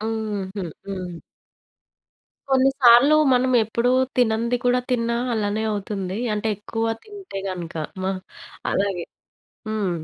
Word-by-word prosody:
హ్మ్. 220 -2 -2
హుహు. 190 -3 -2 0.2
హ్మ్. 180 -3 -5 1.3
కొన్ని 265 0 +5
సార్లూ 245 +4 +7 0.2
మనమెప్పుడూ 245 -2 +2 0.3
తినంది 235 0 +2
కూడా 245 0 +3
తిన్నా 235 -1 +1 0.2
అలానే 210 0 -1
అవుతుందీ. 195 -2 -3 0.2
అంటే, 210 +1 -1
ఎక్కువ 225 +2 -3 0.2
తింటే 400 - -8
గనక. 175 -3 -5 0.3
మ - - -2 0.7
అలాగే 195 -3 0 0.6
హ్మ్. 210 -4 -1
220 Hz, 110 wpm, -23 LUFS, 200-245 Hz, 1.3 s, సార్లూ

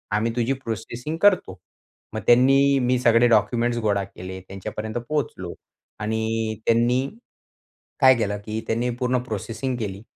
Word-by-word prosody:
आम्ही 110 +2 +1
तुझी 120 +2 +1
प्रोसेसिंग 120 +4 -5
करतो." 205 -3 +3 0.6
मग - - -3
त्यांनी 135 +3 +5
मी 125 0 +2
सगळे 120 -1 +4
डॉक्युमेंट्स 120 +2 +2
गोळा 100 -1 +1
केले 95 -1 -8
त्यांच्यापर्यंत 105 +4 -5
पोहोचलो 135 - -3 0.5
आणि 110 +1 -1
त्यांनी 120 +3 +2 0.9
काय 130 -2 +8
केलं 105 -3 -1
की 110 0 -3
त्यांनी 120 +2 0
पूर्ण 125 0 +1
प्रोसेसिंग 125 +3 -4
केली 100 -3 -5
115 Hz, 130 wpm, -23 LUFS, 110-125 Hz, 0.9 s, काय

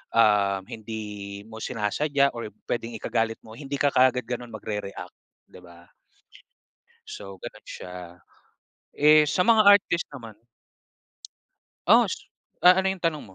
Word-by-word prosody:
um, 100 -4 +3
hindi 105 -2 -7
mo 110 0 -10
sinasadya 140 +5 0
or 115 -3 -6 0.2
puwedeng 115 -1 -3
ikagalit 115 +1 -1
mo, 110 - -12
hindi 140 -1 -5
ka 145 0 +2
kaagad 125 -1 +3
gano'n 120 0 -5
magre-react, 105 -2 -6 0.4
'di - - -14
ba? 85 0 -17 1.2
So 100 -1 -8
gano'n 110 -2 -10
siya. 90 - -9 1.0
Eh, 150 +1 +5
sa 180 - +1
mga 225 -2 +6
artist 200 -4 +5
naman 115 -6 -10 1.6
Oo, - - +7
s - - -2 0.5
ah, 180 +1 +7
ano 190 - +1
'yong 185 - -16
tanong 165 -3 -1
mo? 95 - -17
115 Hz, 135 wpm, -25 LUFS, 105-145 Hz, 1.6 s, Oo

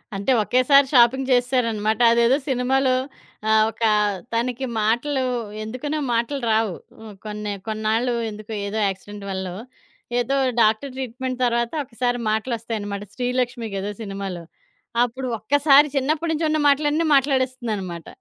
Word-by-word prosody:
అంటే, 200 +7 0
ఒకేసారి 270 +4 +4
షాపింగ్ 255 +2 +4
చేసేసారనమాట. 230 -4 +1
అదేదో 235 +3 +4
సినిమాలో 260 +1 +2 0.5
ఆహ్, 220 0 +5
ఒక 225 +1 -7 0.5
తనకి 245 +3 -1 0.2
మాటలు 245 +6 +1 0.4
ఎందుకనో 255 +7 -4
మాటలు 235 +4 -1
రావు. 220 -3 +1 0.5
కొన్ని 210 0 -4 0.2
కొన్నాళ్ళు 220 +3 0 0.2
ఎందుకో 215 +1 -10 0.2
ఏదో 215 +2 -3
యాక్సిడెంట్ 200 +2 -6
వల్లో. 190 -1 -4 0.6
ఏదో 255 +3 0 0.3
డాక్టర్ 220 +5 +2
ట్రీట్మెంట్ 255 0 -4
తర్వాత 235 -1 0
ఒకసారి 245 +1 -2
మాటలొస్తాయనమాట. 220 -3 -3
'శ్రీలక్ష్మి' 245 -2 -2
గదా 195 +1 -3
సినిమాలో. 195 -4 -5 0.6
అప్పుడు 255 +2 -6
ఒక్కసారి 285 +5 +5
చిన్నప్పడ్నుంచి 310 +3 0
ఉన్న 310 - +1
మాటలన్నీ 295 +3 +2
మాట్లాడేస్తుందనమాట. 250 - -1
240 Hz, 110 wpm, -22 LUFS, 215-265 Hz, 0.6 s, ఆహ్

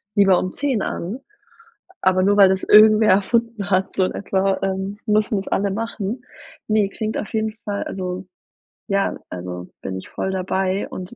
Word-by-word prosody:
lieber 195 -3 +5
um 185 - -3
10:00 265 -8 0
an, 200 +10 -4 0.8
aber 185 0 +3
nur 205 +1 +3
weil 195 -2 +8
das 190 0 0
irgendwer 215 +1 +7
erfunden 215 +1 +1
hat 190 0 +2
so 190 - +2
in - - -2
etwa, 195 -1 0
ähm, 195 +1 -2
müssen 215 -1 +1
es 195 - -8
alle 200 0 0
machen. 225 +2 -4 0.4
Ne, 215 -2 +2
klingt 215 +2 -3
auf 210 - -5
jeden 220 0 -1
Fall, 205 -1 -2
also 185 0 -5 0.6
ja, 195 0 0
also 90 0 -7
bin 95 0 -4
ich 95 - -9
voll 190 - -3
dabei 190 +1 -1
und 185 +5 -8
195 Hz, 170 wpm, -21 LUFS, 185-215 Hz, 0.8 s, weil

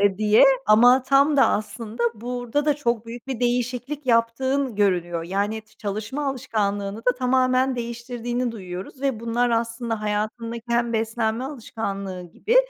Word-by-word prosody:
eee, 200 -1 +2
diye 215 +3 +6 0.2
ama 245 +5 +6
tam 275 +3 +4
da 275 - +6
aslında 220 +2 -3
burada 245 +4 -2
da 295 -1 +3
çok 235 -6 -1
büyük 235 +2 -9
bir 265 -3 -4
değişiklik 250 +3 -1
yaptığın 250 +2 +1
görülüyor. 175 -4 +1
Yani, 205 +4 -2
ç 215 0 -28
çalışma 220 +8 -3
alışkanlığını 205 -6 -2
da 250 +2 +2
tamamen 255 0 +2
değiştirdiğini 240 +1 -3
duyuyoruz 185 +3 -8
ve 270 -5 -1
bunlar 235 +1 0
aslında 230 -1 -1
hayatındaki 215 +2 -3
hem 235 0 +1
beslenme 225 +1 -1
alışkanlığı 200 -8 -5
gibi 395 - -1
235 Hz, 140 wpm, -24 LUFS, 215-250 Hz, 0.2 s, diye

